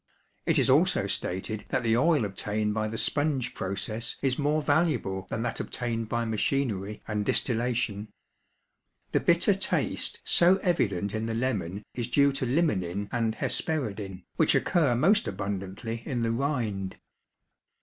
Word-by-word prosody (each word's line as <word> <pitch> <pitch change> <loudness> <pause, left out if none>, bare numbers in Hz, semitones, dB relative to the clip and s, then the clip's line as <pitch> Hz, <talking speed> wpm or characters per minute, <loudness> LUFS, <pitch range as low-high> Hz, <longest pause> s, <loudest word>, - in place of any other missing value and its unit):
It - - +3
is - - +4
also - - +4
stated 100 +4 -3
that 125 - 0
the 115 -1 +3
oil 145 -1 +3
obtained 105 +2 -2
by 110 0 -1
the 110 +1 -4
"sponge 145 -3 +1
process" 110 +5 -3
is 130 0 +1
more 150 +1 +1
valuable 140 - +1
than 110 - -2
that - - -2
obtained 115 -2 -3
by 120 0 0
machinery 110 -3 -1
and 105 -1 -1
distillation. 115 -2 0 1.0
The - - +3
bitter - - +4
taste - - -1
so 175 +2 +5
evident 100 - 0
in 110 +1 -2
the 115 - -2
lemon 105 -6 -2
is 120 -2 -2
due 140 +3 +4
to 135 -2 -2
limonin 100 - 0
and 115 -2 0
hesperidin, 110 - -2
which - - +4
occur 155 -9 +2
most 195 - +3
abundantly 100 +3 -4
in 120 -2 -2
the 115 - +1
rind. 115 -7 -2
115 Hz, 145 wpm, -28 LUFS, 100-135 Hz, 1.0 s, so